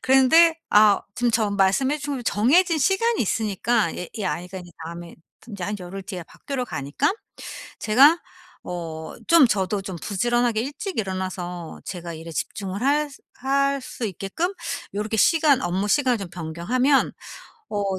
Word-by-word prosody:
그랬는데 320 Hz, +6 st, +5 dB
아 210 Hz, -1 st, +6 dB
지금 245 Hz, +1 st, +1 dB
저 220 Hz, -2 st, +1 dB
말씀해 200 Hz, +9 st, +2 dB
주 285 Hz, -3 st, -4 dB
정해진 320 Hz, -, +3 dB
시간이 410 Hz, -, +2 dB
있으니까 215 Hz, -1 st, 0 dB
얘 180 Hz, -, -5 dB
이 215 Hz, -, -4 dB
아이가 180 Hz, +1 st, -3 dB
인제 175 Hz, -1 st, -11 dB
다음에 170 Hz, +1 st, -8 dB, 0.3 s
튼 240 Hz, -, -14 dB
인제 195 Hz, -3 st, -5 dB
한 205 Hz, +3 st, -3 dB
열흘 185 Hz, +2 st, -7 dB
뒤에 185 Hz, -4 st, -7 dB
학교로 270 Hz, -3 st, -5 dB
가니까 150 Hz, -, -1 dB, 0.7 s
제가 275 Hz, +10 st, +6 dB, 0.5 s
어 165 Hz, -3 st, -6 dB
좀 335 Hz, -5 st, +7 dB
저도 200 Hz, -2 st, 0 dB
좀 190 Hz, -2 st, -6 dB
부지런하게 240 Hz, +2 st, +1 dB
일찍 290 Hz, -, -5 dB
일어나서 185 Hz, -4 st, -4 dB
제가 175 Hz, -2 st, -6 dB
일에 165 Hz, +1 st, -9 dB
집중을 195 Hz, -, -4 dB
할 295 Hz, +3 st, +2 dB
수 275 Hz, -, -15 dB, 0.2 s
할 275 Hz, +1 st, +1 dB
수 250 Hz, -1 st, -6 dB
있게끔 200 Hz, -, -3 dB, 0.4 s
요렇게 210 Hz, +2 st, -2 dB
시간 295 Hz, +2 st, +4 dB
업무 185 Hz, +3 st, -1 dB
시간을 255 Hz, -1 st, +3 dB
좀 195 Hz, -3 st, -6 dB
변경하면 175 Hz, -, +1 dB, 0.6 s
어 200 Hz, -2 st, -1 dB
215 Hz, 315 characters per minute, -24 LUFS, 185-275 Hz, 0.7 s, 좀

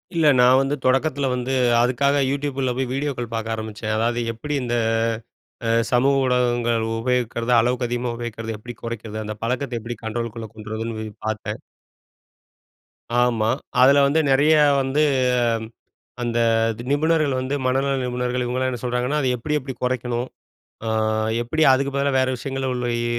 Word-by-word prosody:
இல்ல, 165 Hz, -2 st, +3 dB
நா -, -, +7 dB, 0.2 s
வந்து 135 Hz, +2 st, 0 dB
தொடக்கத்தில 135 Hz, +1 st, +1 dB
வந்து 125 Hz, +1 st, -2 dB, 0.3 s
அதுக்காக 140 Hz, +4 st, +2 dB
யூடியூபில 135 Hz, -2 st, -1 dB
போய் 130 Hz, 0 st, -1 dB
வீடியோக்கள் 135 Hz, -4 st, -3 dB
பார்க்க 115 Hz, 0 st, -2 dB
ஆரம்பிச்சேன். 110 Hz, 0 st, -4 dB
அதாவது, 120 Hz, +2 st, 0 dB
எப்படி 150 Hz, +7 st, -5 dB
இந்த 120 Hz, -1 st, -1 dB, 0.9 s
அ -, -, +1 dB, 0.2 s
சமூக 130 Hz, +3 st, +3 dB
ஊடகங்கள் 120 Hz, -2 st, +1 dB, 0.2 s
உபயோகிக்கிறது? 120 Hz, -1 st, -1 dB
அளவுக்கு 125 Hz, +2 st, +1 dB
அதிகமா 120 Hz, +1 st, -2 dB
உபயோகிக்கிறத 115 Hz, -1 st, -5 dB
எப்படி 120 Hz, +3 st, -9 dB
கொறைக்கிறது? 110 Hz, -2 st, -5 dB
அந்த 105 Hz, 0 st, -5 dB
பழக்கத்தை 125 Hz, +1 st, -2 dB
எப்படி 120 Hz, +2 st, -6 dB
கண்ட்ரோலுக்குள்ள 115 Hz, 0 st, -4 dB
கொண்டு 110 Hz, 0 st, -9 dB
வரதுன்னு 115 Hz, 0 st, -4 dB
சொல்லி 110 Hz, -1 st, -6 dB
பார்த்தேன். 110 Hz, -1 st, -3 dB, 1.6 s
ஆமா. 120 Hz, -3 st, +2 dB, 0.3 s
அதுல 140 Hz, +2 st, +7 dB
வந்து 145 Hz, +3 st, +2 dB
நெறைய 145 Hz, +4 st, +4 dB, 0.3 s
வந்து 135 Hz, +3 st, 0 dB, 1.2 s
அந்த 120 Hz, -1 st, -1 dB, 0.5 s
நிபுணர்கள் 155 Hz, -1 st, +2 dB
வந்து 130 Hz, +2 st, -2 dB
மனநல 135 Hz, +2 st, +1 dB
நிபுணர்கள் 125 Hz, 0 st, -1 dB
இவங்கல்லாம் 130 Hz, +1 st, -1 dB
என்ன 125 Hz, -2 st, -5 dB
சொல்றாங்கன்னா, 125 Hz, +4 st, 0 dB
"அதை 130 Hz, -, +1 dB
எப்படி, 150 Hz, +6 st, -2 dB
எப்படி 130 Hz, 0 st, -6 dB
கொறைக்கணும்? 125 Hz, -1 st, -1 dB, 0.6 s
அ -, -, -1 dB, 0.5 s
எப்படி 140 Hz, +7 st, -1 dB
அதுக்கு 140 Hz, +1 st, +1 dB
பதிலா 140 Hz, 0 st, +1 dB
வேற 130 Hz, -, +1 dB
விஷயங்கள்ல 135 Hz, +1 st, -3 dB
உள்ள 125 Hz, 0 st, -2 dB
இ -, -, -2 dB
125 Hz, 145 wpm, -22 LUFS, 115-135 Hz, 1.6 s, நா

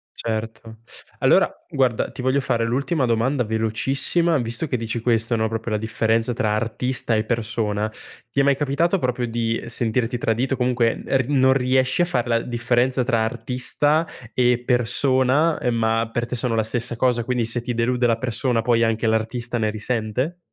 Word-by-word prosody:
Certo. 110 Hz, 0 st, -5 dB, 0.4 s
Allora, -, -, +4 dB, 0.2 s
guarda, 125 Hz, -4 st, 0 dB
ti -, -, -7 dB
voglio 130 Hz, +2 st, +1 dB
fare 120 Hz, -3 st, 0 dB
l'ultima 135 Hz, +5 st, 0 dB
domanda 120 Hz, +3 st, +1 dB
velocissima, 135 Hz, +9 st, +1 dB
visto 120 Hz, +5 st, -2 dB
che 130 Hz, -, -2 dB
dici 115 Hz, 0 st, -3 dB
questo, 115 Hz, 0 st, +1 dB
no, 110 Hz, 0 st, +1 dB
proprio 115 Hz, 0 st, -4 dB
la 105 Hz, -, +1 dB
differenza 110 Hz, +2 st, 0 dB
tra 110 Hz, -3 st, 0 dB
artista 120 Hz, +1 st, -1 dB
e 110 Hz, -, +1 dB
persona. 110 Hz, -2 st, -1 dB, 0.4 s
Ti 140 Hz, -, -2 dB
è -, -, +2 dB
mai 140 Hz, -1 st, +3 dB
capitato 160 Hz, +6 st, +1 dB
proprio 125 Hz, -2 st, -1 dB
di, 115 Hz, 0 st, -1 dB
ehm, -, -, -8 dB
sentirti 120 Hz, +1 st, -1 dB
tradito? 120 Hz, +3 st, 0 dB
Comunque 125 Hz, -2 st, 0 dB
e 135 Hz, -, +2 dB
r 130 Hz, -, 0 dB
non 130 Hz, -2 st, +4 dB
riesci 130 Hz, +3 st, +1 dB
a -, -, +4 dB
far 125 Hz, -10 st, -1 dB
la 115 Hz, -1 st, +1 dB
differenza 120 Hz, +2 st, 0 dB
tra 115 Hz, -3 st, +1 dB
artista 125 Hz, +7 st, 0 dB, 0.3 s
e 125 Hz, -1 st, +2 dB
persona, 130 Hz, +5 st, +2 dB
ehm, 125 Hz, -1 st, 0 dB
ma 115 Hz, 0 st, +1 dB
per 120 Hz, 0 st, -1 dB
te 125 Hz, +1 st, -4 dB
sono 120 Hz, -1 st, 0 dB
la 110 Hz, -, +2 dB
stessa 120 Hz, +2 st, -3 dB
cosa. 120 Hz, -2 st, +2 dB
Quindi 125 Hz, -1 st, -1 dB
se 115 Hz, +1 st, 0 dB
ti 120 Hz, 0 st, -3 dB
delude 120 Hz, +1 st, +1 dB
la 115 Hz, -1 st, +2 dB
persona, 120 Hz, 0 st, 0 dB
poi 115 Hz, 0 st, +2 dB
anche 115 Hz, 0 st, 0 dB
l'artista 115 Hz, +2 st, -1 dB
ne 110 Hz, -2 st, 0 dB
risente? 115 Hz, +8 st, -2 dB
120 Hz, 180 wpm, -22 LUFS, 115-130 Hz, 0.4 s, Allora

